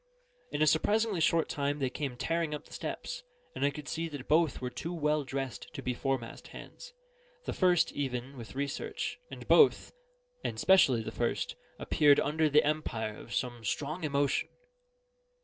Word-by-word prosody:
In 145 - +1
a - - +5
surprisingly 205 +5 +2
short 165 0 +3
time 145 0 -1
they 135 -3 -1
came 135 -3 -4
tearing 165 +1 -1
up 150 - -9
the - - -15
steps; - - -5 0.3
and 135 - -3
I 140 - +4
could 145 0 -8
see 165 +1 -2
that 145 -4 -8
both 160 -1 +3
were 125 -1 -4
too 160 +7 -5
well 150 -1 +1
dressed 135 -1 -5
to - - -6
be 125 - -1
foremast 130 -2 -3
hands - - -11 0.5
the - - -2
first 180 -3 +3
even 130 -1 -3
with 120 -1 -9
research, 140 - -3
and - - -9
both, 440 - +5 0.5
and - - -3
specially 135 -12 +5
the 110 - -5
first, 120 +1 -1 0.2
appeared 145 -2 +4
under 155 +1 +2
the 150 +1 +5
empire 115 -8 -1
of - - -12
some 120 -2 -2
strong 155 - -2
emotion. 140 -2 +1
145 Hz, 170 wpm, -31 LUFS, 130-160 Hz, 0.5 s, a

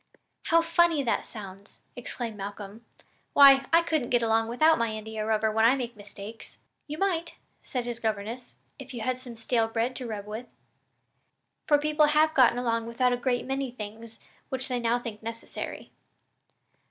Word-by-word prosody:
"How 335 0 +4
funny 335 -3 +3
that 235 - -1
sounds!" 200 -1 -11
exclaimed 235 -2 -5
Malcolm. 205 +2 -8 0.5
"Why, 275 -1 +8
I 335 +1 +6
couldn't 310 -7 -1
get 240 -1 +2
along 225 0 +2
without 310 +7 +4
my 230 - +2
India 220 0 -5
rubber 220 0 +1
when 220 +1 +2
I 235 +4 +6
make 245 -3 -4
mistakes," 205 +1 -11 0.3
"You 300 +1 -5
might," 345 -2 -1 0.3
said 250 -2 -4
his 240 -1 -4
governess, 225 +2 -4 0.2
"if 270 -1 -9
you 235 - -5
had 255 +2 -1
some 250 -2 -8
stale 225 0 0
bread 230 +3 -1
to 255 - -5
rub 210 -3 -5
with; 220 +4 -6 1.2
for 295 -1 +5
people 300 +1 +3
have 305 +1 +3
gotten 255 -5 +5
along 230 -2 -1
without 245 +2 +1
a - - +2
great 245 0 -1
many 270 0 -2
things 225 -1 -9 0.3
which 260 0 -3
they 250 -1 -1
now 235 0 +1
think 230 -3 -7
necessary." 230 0 -7
240 Hz, 170 wpm, -27 LUFS, 225-270 Hz, 1.2 s, Why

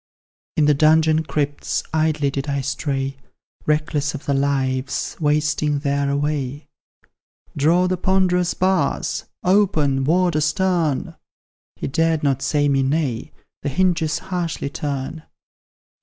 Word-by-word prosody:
In 155 - +4
the 150 - +5
dungeon 155 +2 +4
crypts 145 -1 -2
idly 155 -3 +1
did 135 +2 -3
I 140 -1 0
stray, 135 -1 -2 0.5
Reckless 150 -1 0
of 150 - -8
the 140 - +1
lives 135 -1 -1
wasting 150 -1 +1
there 140 0 0
away; 145 0 -2 0.9
"Draw 165 +5 +3
the 185 0 0
ponderous 180 -1 +1
bars! 185 0 0 0.2
open, 170 -9 +2
Warder 175 0 +2
stern!" 160 -2 0 0.6
He - - -6
dared 160 +2 +1
not 135 -2 +1
say 145 0 +1
me 135 -1 +2
nay 135 -1 -1 0.3
the 145 - -2
hinges 165 0 +1
harshly 170 -6 -3
turn. 145 +2 -4
150 Hz, 120 wpm, -21 LUFS, 140-160 Hz, 0.9 s, the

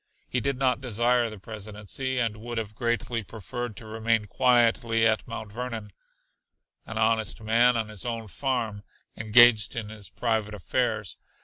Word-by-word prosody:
He 125 - -1
did 135 +1 -1
not 130 -2 +1
desire 120 0 +2
the 110 - -9
Presidency, 105 +5 -4
and 115 -3 0
would 120 +2 -6
have 105 -2 -3
greatly 115 +1 -1
preferred 110 +3 -6
to 115 - -9
remain 110 0 0
quietly 115 -1 +3
at 110 -1 +2
Mount 110 -2 -7
Vernon, 115 -2 -5 1.0
"an 115 - -6
honest 110 0 +1
man 120 +2 +4
on 110 -1 -1
his 110 -2 -5
own 115 -2 -4
farm," 115 -3 -2 0.3
engaged 110 -1 +6
in 110 -3 -3
his 105 -4 -8
private 110 0 -1
affairs. 95 - -1
115 Hz, 150 wpm, -27 LUFS, 110-120 Hz, 1.0 s, engaged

